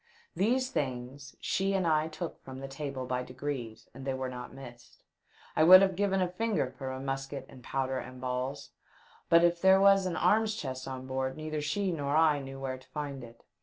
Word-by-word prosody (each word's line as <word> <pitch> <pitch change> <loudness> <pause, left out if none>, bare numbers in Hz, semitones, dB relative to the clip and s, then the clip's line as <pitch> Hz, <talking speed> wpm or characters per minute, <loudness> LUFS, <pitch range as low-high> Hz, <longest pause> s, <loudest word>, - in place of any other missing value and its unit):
These 255 +6 +1
things 135 - -4
she 195 +1 0
and 190 -2 +1
I 155 -1 +2
took 165 +1 -6
from 130 -1 -9
the 135 - -6
table 135 -1 -5
by 125 0 -1
degrees, 125 -3 -5
and 135 - -10
they 135 -1 -1
were 130 0 -3
not 125 -1 -7
missed. 120 -3 -13 0.5
I 155 - +4
would 185 +3 +10
have 190 -2 +1
given 195 0 +1
a - - +1
finger 200 - -1
for 135 -1 -5
a 130 - -5
musket 135 0 -4
and 130 -2 -14
powder 130 +1 -1
and 130 0 -9
balls; 130 +2 -3 0.6
but 170 0 +6
if 170 0 +3
there 190 0 +6
was 195 -1 +5
an 175 - -2
arms 220 0 +3
chest 130 -9 -5
on 130 -1 -6
board 130 +1 -2
neither 155 -1 -3
she 185 +6 0
nor 145 -3 -1
I 155 -2 +4
knew 135 0 -8
where 130 -1 -4
to 130 - -20
find 145 -3 -5
it. 115 0 -13
140 Hz, 205 wpm, -30 LUFS, 130-175 Hz, 0.6 s, would